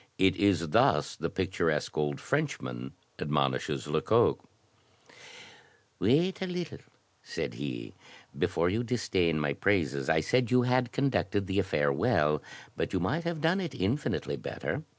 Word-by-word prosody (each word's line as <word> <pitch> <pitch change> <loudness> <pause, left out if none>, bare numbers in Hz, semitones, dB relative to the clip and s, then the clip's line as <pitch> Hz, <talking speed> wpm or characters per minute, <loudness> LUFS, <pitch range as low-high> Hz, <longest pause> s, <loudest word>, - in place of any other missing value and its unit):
It 95 -1 +4
is 90 -5 +2
thus - - +3
the - - -3
picturesque - - -1
old 75 -2 -1
Frenchman 65 - -2 0.3
admonishes 70 -3 0
Lecoq: 75 +1 +2 1.6
*'Wait 155 - +2
a 190 - -1
little," 175 -3 -4 0.4
said - - -4
he, 65 -1 -5 0.4
"before 85 - +1
you 110 +7 0
disdain 95 -9 +1
my 75 -2 0
praises. 75 -7 0
I 80 0 +4
said 125 +9 +1
you 125 0 +4
had 125 -1 +1
conducted 105 -7 0
the 95 +1 0
affair 75 -7 +1
well, 75 +2 +2 0.3
but - - -2
you 95 - +1
might 145 - -1
have 170 -2 -2
done 170 +4 +2
it 165 -7 -5
infinitely 125 +6 -1
better. 135 - -4
95 Hz, 140 wpm, -29 LUFS, -, 1.6 s, It